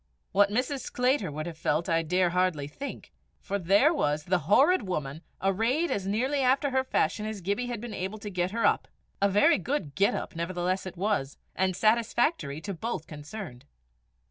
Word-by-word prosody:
What 200 Hz, +1 st, +4 dB
Mrs. 250 Hz, +6 st, -1 dB
Sclater 250 Hz, -, 0 dB
would 155 Hz, +1 st, -4 dB
have 165 Hz, -2 st, -7 dB
felt, 155 Hz, +1 st, 0 dB
I 165 Hz, 0 st, +2 dB
dare 180 Hz, +2 st, +1 dB
hardly 180 Hz, -5 st, +1 dB
think; 275 Hz, -, -8 dB, 0.3 s
for 200 Hz, +1 st, -3 dB
there 200 Hz, -, +4 dB
was 150 Hz, -, 0 dB
"the 175 Hz, -3 st, -1 dB
horrid 295 Hz, -, +5 dB
woman" 150 Hz, -4 st, -3 dB, 0.2 s
arrayed 230 Hz, -, +1 dB
as 195 Hz, -1 st, -2 dB
nearly 255 Hz, +8 st, 0 dB
after 270 Hz, +2 st, +2 dB
her 260 Hz, 0 st, +2 dB
fashion 215 Hz, -3 st, 0 dB
as 215 Hz, -2 st, -4 dB
Gibbie 200 Hz, +7 st, -2 dB
had 240 Hz, -3 st, -4 dB
been 235 Hz, 0 st, -7 dB
able 190 Hz, +4 st, -4 dB
to 205 Hz, -1 st, -7 dB
get 180 Hz, -1 st, 0 dB
her 230 Hz, +4 st, -1 dB
up! -, -, +2 dB, 0.3 s
A 200 Hz, -, +4 dB
very 200 Hz, 0 st, +4 dB
good 190 Hz, -, -2 dB
"get 195 Hz, +8 st, +2 dB
up" -, -, -5 dB
nevertheless 180 Hz, +2 st, -2 dB
it 185 Hz, -1 st, -8 dB
was, 185 Hz, -8 st, -1 dB, 0.2 s
and 190 Hz, -1 st, +1 dB
satisfactory 230 Hz, -, +1 dB
to 200 Hz, -, -4 dB
both 185 Hz, -3 st, -4 dB
concerned. 150 Hz, -, -9 dB
195 Hz, 185 wpm, -28 LUFS, 170-235 Hz, 0.3 s, horrid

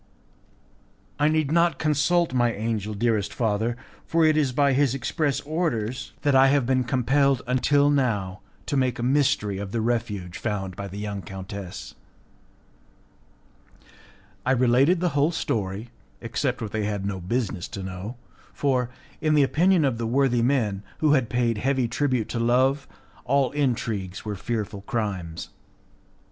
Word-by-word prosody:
"I 145 Hz, -, +4 dB
need 155 Hz, -2 st, +1 dB
not 170 Hz, -3 st, +3 dB
consult 155 Hz, +1 st, +2 dB
my 120 Hz, -2 st, +3 dB
angel, 110 Hz, -1 st, -3 dB
dearest 110 Hz, -1 st, 0 dB
father, 115 Hz, +1 st, -1 dB, 0.3 s
for 165 Hz, 0 st, +2 dB
it 155 Hz, -1 st, +4 dB
is 145 Hz, -4 st, +2 dB
by 140 Hz, +1 st, +3 dB
his 135 Hz, -1 st, +2 dB
express 140 Hz, +2 st, -1 dB
orders 130 Hz, -7 st, -2 dB
that 145 Hz, -2 st, +3 dB
I 135 Hz, 0 st, +6 dB
have 140 Hz, -2 st, +3 dB
been 130 Hz, 0 st, +1 dB
compelled 135 Hz, +1 st, +2 dB
until 140 Hz, +3 st, +3 dB
now 105 Hz, -9 st, 0 dB, 0.2 s
to -, -, -2 dB
make 130 Hz, -3 st, +1 dB
a 120 Hz, -, -4 dB
mystery 125 Hz, -7 st, +1 dB
of 100 Hz, -1 st, -5 dB
the 115 Hz, -, -1 dB
refuge 105 Hz, -6 st, -2 dB
found 95 Hz, -4 st, -3 dB
by 100 Hz, -, -5 dB
the 100 Hz, +1 st, -8 dB
young 105 Hz, -1 st, -4 dB
countess." 95 Hz, 0 st, -8 dB, 2.5 s
I 130 Hz, -, +2 dB
related 130 Hz, +8 st, +3 dB
the 180 Hz, -, +2 dB
whole 145 Hz, +1 st, +2 dB
story, 105 Hz, -, -2 dB, 0.3 s
except 125 Hz, +1 st, -2 dB
what 105 Hz, -, -5 dB
they 110 Hz, -1 st, -1 dB
had 105 Hz, -2 st, -2 dB
no 100 Hz, -1 st, -3 dB
business 100 Hz, -1 st, -2 dB
to 100 Hz, -, -7 dB
know, 95 Hz, +6 st, -6 dB, 0.4 s
for, 130 Hz, -4 st, 0 dB, 0.3 s
in 155 Hz, -1 st, +2 dB
the 145 Hz, -, +5 dB
opinion 170 Hz, +4 st, +3 dB
of 125 Hz, -4 st, 0 dB
the 115 Hz, -, -1 dB
worthy 125 Hz, -1 st, +2 dB
men, 115 Hz, -6 st, +1 dB, 0.2 s
who 155 Hz, -2 st, +3 dB
had 130 Hz, -6 st, +2 dB
paid 120 Hz, -3 st, 0 dB
heavy 130 Hz, 0 st, +1 dB
tribute 125 Hz, -1 st, 0 dB
to 120 Hz, -, -2 dB
Love, 130 Hz, +4 st, +2 dB, 0.4 s
all 135 Hz, -1 st, +2 dB
intrigues 110 Hz, -9 st, -2 dB
were 105 Hz, -, -2 dB
fearful 105 Hz, -1 st, -4 dB
crimes. 100 Hz, -9 st, -4 dB
120 Hz, 155 wpm, -25 LUFS, 105-140 Hz, 2.5 s, I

